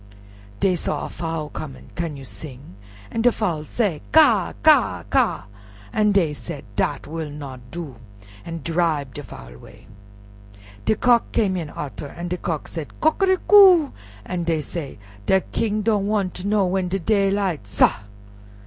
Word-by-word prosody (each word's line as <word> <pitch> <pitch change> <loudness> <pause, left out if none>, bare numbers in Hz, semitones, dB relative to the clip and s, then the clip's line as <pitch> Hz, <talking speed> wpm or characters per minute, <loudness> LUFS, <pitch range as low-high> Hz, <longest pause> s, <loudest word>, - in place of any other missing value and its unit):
Dey 190 - +3
saw - - -2
a - - -6
Fowl 160 -3 -4
coming. 140 -4 -8
"Can 165 -4 -4
you 135 - -10
sing?" 125 +1 -10 0.4
An' 225 - -1
de 245 +1 +5
Fowl 170 -10 -2
say 200 -4 -1
"Ka! - - +5
ka! - - +4
ka!" - - +2 0.5
an' 210 -1 +3
dey 175 -7 +2
said, 145 -2 -8
"Dat 135 +7 -1
will 160 -1 -5
not 135 -4 -9
do," 155 -6 -7 0.5
an' 165 -1 -6
dribe 160 -5 0
de - - -6
Fowl - - -11
'way. - - -16 1.0
De - - +3
Cock 240 0 +3
came 195 -4 +1
in 165 -4 -4
arter, 145 0 -6
an' 175 +5 -7
de 180 - -2
Cock 165 -4 -3
said, 160 -3 -7
"Coquericou," 375 -1 +6 0.3
an' 180 -1 -3
dey 165 -2 0
said, 150 -1 -6 0.3
"De 190 0 +4
King 215 -1 0
don' 205 -2 +1
wan' 205 -3 0
ter 185 +3 -6
know 205 -2 +3
when 185 0 0
de 185 +2 -1
daylight, 195 - 0
sah!" 100 - +3
170 Hz, 160 wpm, -22 LUFS, 150-205 Hz, 1.0 s, Coquericou